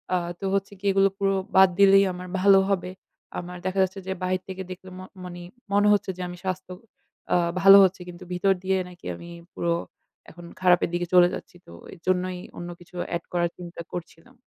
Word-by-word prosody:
আ - - +3 0.2
তো - - -5
হচ্ছে 195 +1 -2
গিয়ে 200 0 +1
এগুলো 195 0 +4
পুরো 195 0 +2 0.2
বাদ 190 0 +8
দিলেই 195 0 +7
আমার 180 0 -8
ভালো 195 0 +7
হবে। 185 -2 -1 0.5
আমার 180 +1 -7
দেখা 190 +1 -1
যাচ্ছে 190 +1 -3
যে 190 - -1
বাহির 185 0 0
থেকে 190 0 -6
দেখলে 185 +1 -9
ম - - -7 0.2
মনি 175 -1 -8 0.3
মনে 205 +1 +4
হচ্ছে 200 - 0
যে, 185 - -6
আমি 180 - -8
স্বাস্থ্য 185 -1 -4 0.6
আ - - +5 0.2
ভালো 195 0 +10
হচ্ছে 190 0 -2
কিন্তু, 175 +1 -10
ভিতর 190 +2 +2
দিয়ে 190 0 +1
নাকি 180 0 -16
আমি 170 - -11 0.2
পুরো 170 0 0 0.6
এখন 175 +1 -12 0.2
খারাপের 180 -2 +4
দিকে 175 0 -1
চলে 180 -1 +7
যাচ্ছি, - - -10
তো - - -13 0.2
এজন্যই 180 +1 -1 0.2
অন্য 175 - -6
কিছু 175 - -17 0.2
add 170 - -4
করার 175 -1 +1
চিন্তা 170 -1 -8
করছিলাম। 175 +7 -9
185 Hz, 195 wpm, -25 LUFS, 175-195 Hz, 0.6 s, ভালো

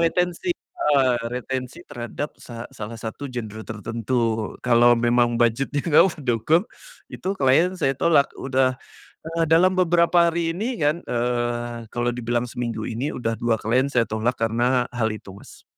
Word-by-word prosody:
retensi, 180 - 0 0.3
heeh 135 - +3
retensi 125 +1 -4
terhadap 120 +5 -6
sa 120 -1 -8
salah 110 +2 -7
satu 115 +5 -6
genre 110 -4 -6
tertentu. 115 +1 -2
Kalau 120 0 +5
memang 120 0 +2
budget-nya 120 +5 +1
enggak 165 +2 +6
mendukung 150 - +1 0.5
itu 185 - -5
klien 165 +6 +3
saya 135 -5 +1
tolak, 150 -3 +3
udah 130 -1 +1 0.5
heeh 165 +1 -1
dalam 165 +4 +5
beberapa 170 0 +4
hari 165 0 -1
ini 205 +8 -3 0.2
kan, 150 +2 +3
eee, 120 -1 -2
kalau 120 0 0
dibilang 120 0 -1
seminggu 120 -2 -4
ini 120 +7 -3
udah 115 -2 -2
2 120 -1 +2
klien 125 +5 +2
saya 125 -4 +2
tolak 110 +3 0
karena 120 +3 +1
hal 120 -2 0
itu 105 -2 -10
Mas. 100 - -14
125 Hz, 150 wpm, -23 LUFS, 115-145 Hz, 0.5 s, enggak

